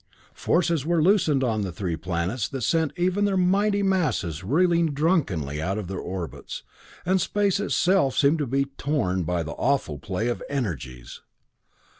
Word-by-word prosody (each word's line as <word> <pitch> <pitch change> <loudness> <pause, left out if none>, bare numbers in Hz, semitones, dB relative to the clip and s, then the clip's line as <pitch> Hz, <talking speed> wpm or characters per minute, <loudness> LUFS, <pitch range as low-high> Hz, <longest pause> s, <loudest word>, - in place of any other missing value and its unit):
Forces 165 -4 +1
were 170 +2 +1
loosed 190 +2 +4
on 110 -4 0
the 95 -2 -3
three 90 -1 -3
planets 90 +7 -2
that 135 -3 -5
sent 160 +1 +1
even 185 +3 +1
their 195 -1 +1
mighty 200 +3 +2
masses 135 - 0
reeling 165 - +2
drunkenly 100 - 0
out 95 +5 -1
of 105 -4 -4
their 95 0 -4
orbits, 90 -2 -6 0.4
and 185 +1 +2
space 200 -2 +1
itself 185 -8 +2
seemed 150 +3 +4
to 145 - -1
be 135 +3 +1
torn 135 -9 -1
by 85 0 -1
the 75 - -6
awful 120 - -1
play 95 +8 -2
of 120 - -2
energies. 65 - -4
135 Hz, 160 wpm, -25 LUFS, -, 0.4 s, loosed